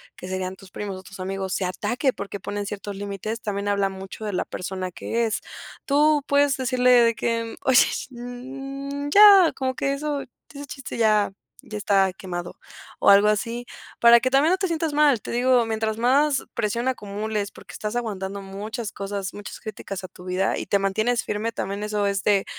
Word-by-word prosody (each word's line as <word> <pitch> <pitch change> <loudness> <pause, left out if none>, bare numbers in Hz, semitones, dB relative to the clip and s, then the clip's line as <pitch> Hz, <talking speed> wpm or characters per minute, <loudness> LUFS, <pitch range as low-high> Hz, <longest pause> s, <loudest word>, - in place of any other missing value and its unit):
que 180 - -9
serían 185 0 -3
tus 190 -1 -16
primos 200 -2 -5
o 185 - -11
tus 195 0 -12
amigos, 190 0 -3
se - - -1
ataque 215 +9 0
porque 200 -4 -6
ponen 205 +1 -4
ciertos 205 0 -6
límites, 205 +3 -4
también 205 -2 -3
habla 200 -1 +1
mucho 190 +3 -8
de 205 - -3
la - - -1
persona 185 0 -4
que 230 +6 -1
es. 215 - -2 0.4
Tú 295 +1 +3
puedes 285 -1 +3
decirle 255 -1 +2
de 240 -2 +6
que: 230 0 -2
"Oye, 260 0 +6 0.2
mm, 270 +3 -6
ya, 400 0 +8
como 260 -1 -2
que 275 +1 0
eso, 290 0 -2 0.3
ese 285 +1 -7
chiste 275 -1 -7
ya 215 -3 +3 0.3
ya 215 - -7
está 195 -2 +3
quemado", 175 -2 -6 0.4
o - - +6
algo 200 +1 +7
así, 230 +3 -1 0.3
para 235 0 +8
que 255 +2 -1
también 280 +5 +4
no 370 - +3
te 385 - -1
sientas 325 -2 -1
mal, 290 -6 +4
te - - -8
digo, 245 0 +3
mientras 220 -1 -1
más 270 +4 +3
presión 235 +2 -1
acumules, 210 -3 -2
porque - - -14
estás 210 +1 -4
aguantando 200 -4 -3
muchas 205 +3 -5
cosas, 195 -1 -4
muchas 205 0 -8
críticas 195 -2 -7
a - - -5
tu 180 +1 -15
vida, 185 +1 0
y - - -4
te 200 +1 +2
mantienes 220 +5 +1
firme 210 +2 -2
también 200 -1 -4
eso 210 -1 0
es 195 -1 -1
de 200 -2 +3
215 Hz, 190 wpm, -24 LUFS, 200-255 Hz, 0.4 s, ya